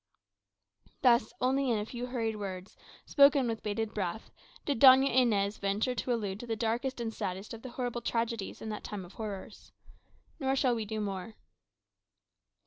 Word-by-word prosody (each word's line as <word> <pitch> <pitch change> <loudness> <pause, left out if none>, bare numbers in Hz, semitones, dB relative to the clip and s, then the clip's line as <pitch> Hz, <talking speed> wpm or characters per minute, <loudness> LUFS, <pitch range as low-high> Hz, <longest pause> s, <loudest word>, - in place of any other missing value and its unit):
_ - - -29
Thus, 235 -3 +4
only 265 +1 +2
in 230 - +2
a 210 - -2
few 245 +2 -5
hurried 230 -3 -2
words, 190 -1 -6 0.3
spoken 280 -2 +5
with 225 -1 -3
'bated 215 +1 -2
breath, 200 +1 -4 0.3
did 280 -6 -1
Doña 265 0 +8
Inez 210 -5 +2
venture 200 +6 0
to 250 +1 -2
allude 205 -4 -2
to 240 - -8
the 225 - -1
darkest 235 +4 -1
and 225 -1 -3
saddest 190 +2 -4
of 225 - -8
the 255 - -7
horrible 245 -1 -3
tragedies 230 -3 -2
in 220 - -5
that 210 - -5
time 200 -3 -6
of 175 - -14
horrors. 210 -1 -7 0.7
Nor 270 -2 +1
shall 260 -2 +2
we 225 -2 -2
do 215 +1 -3
more. 200 +1 -4
225 Hz, 175 wpm, -31 LUFS, 210-250 Hz, 0.7 s, Doña